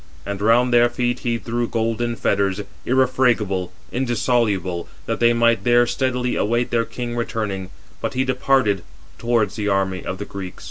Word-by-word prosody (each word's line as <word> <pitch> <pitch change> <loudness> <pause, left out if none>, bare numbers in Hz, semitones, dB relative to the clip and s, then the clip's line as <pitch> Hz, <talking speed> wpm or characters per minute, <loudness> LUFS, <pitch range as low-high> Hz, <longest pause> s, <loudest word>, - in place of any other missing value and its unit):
And 100 0 -4
round 120 +3 +4
their 120 0 +5
feet 120 0 -1
he 120 -1 -1
threw 120 +1 -2
golden 115 +1 -1
fetters, 100 -2 0 0.3
irrefragable, 120 -8 +2 0.2
indissoluble, 115 -8 0 0.2
that - - -2
they 120 0 +5
might 115 0 +3
there 120 0 +5
steadily 125 0 -1
await 120 +3 0
their 115 -1 +2
king 120 +1 -5
returning, 105 -5 -3 0.3
but 140 - -3
he 130 - +2
departed 130 -6 +2 0.4
towards 115 -3 +1
the 105 -1 -2
army 95 -2 0
of 95 - -4
the 100 - -5
Greeks. 95 -3 -7
115 Hz, 155 wpm, -21 LUFS, 100-120 Hz, 0.4 s, their